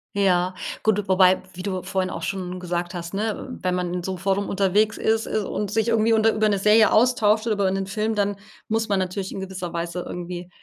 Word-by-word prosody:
Ja, 185 Hz, -2 st, +2 dB, 0.3 s
gut, 210 Hz, -2 st, +1 dB
wobei- 185 Hz, 0 st, +5 dB
wie 185 Hz, 0 st, -8 dB
du 185 Hz, -2 st, -3 dB
vorhin 190 Hz, 0 st, -1 dB
auch 165 Hz, -, -5 dB
schon 185 Hz, -1 st, -4 dB
gesagt 175 Hz, 0 st, -3 dB
hast- 170 Hz, 0 st, -6 dB
ne, 215 Hz, +4 st, -2 dB
wenn 185 Hz, -1 st, 0 dB
man 180 Hz, -1 st, -2 dB
in 180 Hz, -1 st, -3 dB
so 190 Hz, +1 st, -3 dB
Forum 195 Hz, +2 st, -1 dB
unterwegs 200 Hz, +3 st, +2 dB
ist 220 Hz, 0 st, +1 dB
und 210 Hz, -1 st, -2 dB
sich 220 Hz, +1 st, +1 dB
irgendwie 230 Hz, -1 st, +3 dB
unter 225 Hz, 0 st, +4 dB
über 215 Hz, 0 st, +2 dB
'ne 200 Hz, -, +1 dB
Serie 210 Hz, +2 st, +5 dB
austauscht 220 Hz, -2 st, +3 dB
oder 225 Hz, -, +2 dB
über 195 Hz, -2 st, +1 dB
'nen 195 Hz, 0 st, -2 dB
Film 215 Hz, +2 st, -1 dB
dann 205 Hz, -1 st, 0 dB, 0.3 s
muss 225 Hz, 0 st, -1 dB
man 200 Hz, -2 st, +2 dB
natürlich 185 Hz, +1 st, -3 dB
in -, -, -5 dB
gewisser 190 Hz, -2 st, -5 dB
Weise 170 Hz, +1 st, -3 dB
irgendwie 175 Hz, 0 st, -6 dB
195 Hz, 215 wpm, -23 LUFS, 180-215 Hz, 0.3 s, wobei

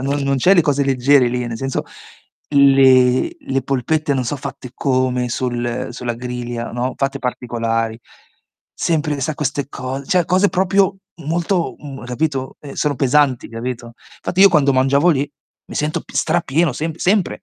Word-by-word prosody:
non 140 Hz, +2 st, -1 dB
non 140 Hz, 0 st, +1 dB
c'è 185 Hz, +9 st, +4 dB
le 175 Hz, -, +6 dB
cose 140 Hz, -1 st, +1 dB
leggere 135 Hz, 0 st, +4 dB
lì, 125 Hz, 0 st, -2 dB
nel 115 Hz, -1 st, -4 dB
senso 135 Hz, +2 st, -2 dB, 0.7 s
le 135 Hz, -, +5 dB
le 135 Hz, -, -2 dB
polpette 145 Hz, +2 st, 0 dB
non 130 Hz, -2 st, -1 dB
so' 145 Hz, +5 st, -2 dB
fatte 130 Hz, -2 st, -8 dB
come 130 Hz, -2 st, 0 dB
sul 120 Hz, -1 st, -2 dB
sulla 120 Hz, -1 st, -4 dB
griglia, 120 Hz, -1 st, -5 dB
no, 125 Hz, +2 st, -2 dB
fatte 135 Hz, 0 st, -1 dB
particolari. 115 Hz, -3 st, -2 dB, 0.8 s
Sempre 150 Hz, -3 st, -1 dB
sa 150 Hz, +3 st, -1 dB
queste 145 Hz, -2 st, -2 dB
cose 135 Hz, +1 st, -5 dB
cioè 180 Hz, -2 st, +2 dB
cose 185 Hz, +4 st, +3 dB
proprio 195 Hz, +1 st, +2 dB, 0.2 s
molto, 170 Hz, +3 st, -1 dB
m 135 Hz, -4 st, -9 dB
capito, 130 Hz, +1 st, -2 dB
ehm, 140 Hz, -2 st, -9 dB
sono 150 Hz, -1 st, 0 dB
pesanti 135 Hz, -1 st, +2 dB
capito, 120 Hz, +1 st, -5 dB, 0.3 s
infatti 185 Hz, -, -2 dB
io 200 Hz, -, +9 dB
quando 140 Hz, -4 st, +3 dB
mangiavo 135 Hz, +5 st, +3 dB
lì 145 Hz, -2 st, 0 dB, 0.4 s
mi -, -, -10 dB
sento 150 Hz, +1 st, -1 dB
p -, -, -16 dB
strapieno 160 Hz, 0 st, +1 dB
semp 160 Hz, +4 st, -4 dB
sempre. 195 Hz, 0 st, +1 dB
135 Hz, 160 wpm, -19 LUFS, 125-150 Hz, 0.8 s, io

